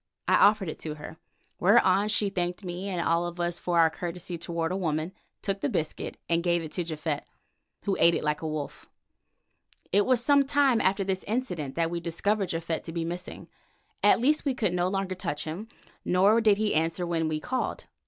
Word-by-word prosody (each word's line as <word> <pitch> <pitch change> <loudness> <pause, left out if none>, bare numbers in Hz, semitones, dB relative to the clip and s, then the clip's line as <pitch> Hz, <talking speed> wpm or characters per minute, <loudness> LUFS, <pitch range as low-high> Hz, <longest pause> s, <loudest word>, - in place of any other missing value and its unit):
I - - +3
offered 205 -2 +5
it 155 - -5
to 155 -1 -4
her, 150 +1 -10 0.4
whereon 200 0 +4
she 210 -2 +2
thanked 180 0 -2
me 180 +3 -4
and 180 -3 -1
all 170 +1 +2
of 175 0 -8
us 175 0 -1
for 175 -1 -1
our 165 -1 +5
courtesy 175 +2 -5
toward 165 0 -3
a - - -1
woman, 160 -1 -2 0.3
took 195 0 -2
the 145 - 0
biscuit, 155 - -3
and 170 0 +2
gave 175 -1 +1
it 155 - -7
to 180 - -1
Japhet, 155 -2 -3 0.6
who 200 -2 0
ate 170 0 +5
it - - -2
like 150 0 0
a 160 - -3
wolf. 155 -2 -5 1.0
It 200 +2 +3
was 250 -2 +2
some 280 -1 +4
time 275 -5 +3
after 195 +1 +2
this 190 -1 -2
incident 190 - -2
that 165 0 0
we 170 - -2
discovered 190 +4 -1
Japhet 165 0 -2
to 165 - -6
be 165 0 -2
missing; 175 +2 -6 0.5
at - - +5
least 295 +6 +2
we 275 -3 0
could 210 -7 0
no 180 0 +1
longer 195 0 -1
touch 175 -5 -3
him, 170 +8 -6 0.4
nor 200 +5 +4
did 210 -3 +4
he 215 0 +1
answer 165 +3 0
when 165 -2 0
we 155 -1 -1
called. 255 +10 -3
175 Hz, 205 wpm, -27 LUFS, 165-200 Hz, 1.0 s, offered